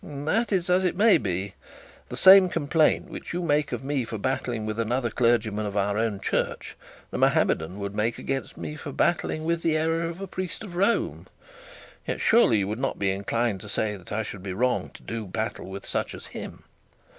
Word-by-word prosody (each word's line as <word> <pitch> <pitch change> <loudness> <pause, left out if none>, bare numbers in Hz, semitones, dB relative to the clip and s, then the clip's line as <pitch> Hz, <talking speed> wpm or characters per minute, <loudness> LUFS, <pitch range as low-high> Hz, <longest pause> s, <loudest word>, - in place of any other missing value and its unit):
'That's 170 +6 -1
as 180 +1 +3
it 180 - +1
may 215 +1 +6
be. 95 +1 -3 0.6
The - - -5
same 190 -1 +8
complaint 155 -1 +2
which - - -7
you 175 +1 -2
make 150 -2 +1
of 120 0 -4
me 140 -1 -1
for 115 -1 -5
battling 120 -1 -2
with 110 +1 -3
another 120 +1 0
clergyman 110 -3 +1
of 100 0 -4
our 100 0 +1
own 110 -2 0
church, - - -2 0.4
the - - -3
Mahometan 80 +5 +2
would 100 -1 -4
make 110 +3 0
against 135 0 -4
me 150 - -5
for 150 -1 -7
battling 160 0 0
with 170 0 0
the 160 -2 +2
error 165 +1 +1
of 170 +2 -5
a 195 - -4
priest 185 +2 -5
of 185 -5 -8
Rome. 200 +6 0 0.8
Yet, - - -2
surely, 225 - +5
you 100 -2 0
would 105 +3 -3
not 135 - -1
be 95 -1 +1
inclined 100 +1 -1
to 105 - -9
say 105 +1 -1
that 90 -3 -13
I 110 +1 -1
should 105 -2 -7
be 95 -1 -5
wrong 125 +6 0
to - - -13
do 115 -2 -5
battle 110 +2 -4
with 95 +1 -7
such - - -2
as - - -10
him. - - -8
120 Hz, 205 wpm, -26 LUFS, 105-165 Hz, 0.8 s, same